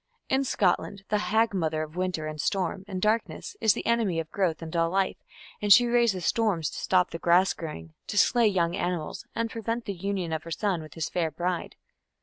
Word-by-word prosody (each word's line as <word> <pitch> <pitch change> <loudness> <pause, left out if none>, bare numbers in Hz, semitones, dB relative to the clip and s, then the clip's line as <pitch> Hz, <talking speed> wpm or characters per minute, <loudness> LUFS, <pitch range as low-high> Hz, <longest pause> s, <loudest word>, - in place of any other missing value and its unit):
In 265 +1 +2
Scotland 195 -2 0
the 210 - +2
hag 220 +1 +2
mother 160 -4 0
of 155 +1 -9
winter 180 -3 -2
and 155 -1 -4
storm 190 0 -1
and 190 -2 -4
darkness 215 - -1
is 220 - +5
the - - -5
enemy 225 -8 +1
of 160 -1 -5
growth 175 -5 0
and 160 +1 -7
all 165 0 +2
life, 190 +1 0 0.4
and 205 -1 0
she 245 +4 +9
raises 235 -7 +2
storms 205 -9 +1
to - - -6
stop 180 -1 +2
the 165 - -5
grass 175 +3 +4
growing, 80 - -8
to 205 - -4
slay 235 +2 +5
young 175 -4 +1
animals, 175 -4 -3
and 230 0 -1
prevent 230 +1 -3
the 200 - -3
union 190 -2 -3
of 160 - -2
her 165 - -10
son 180 +1 -1
with 155 - -11
his 165 - -2
fair 170 -3 -1
bride. 175 +3 -3
185 Hz, 210 wpm, -27 LUFS, 165-210 Hz, 0.4 s, she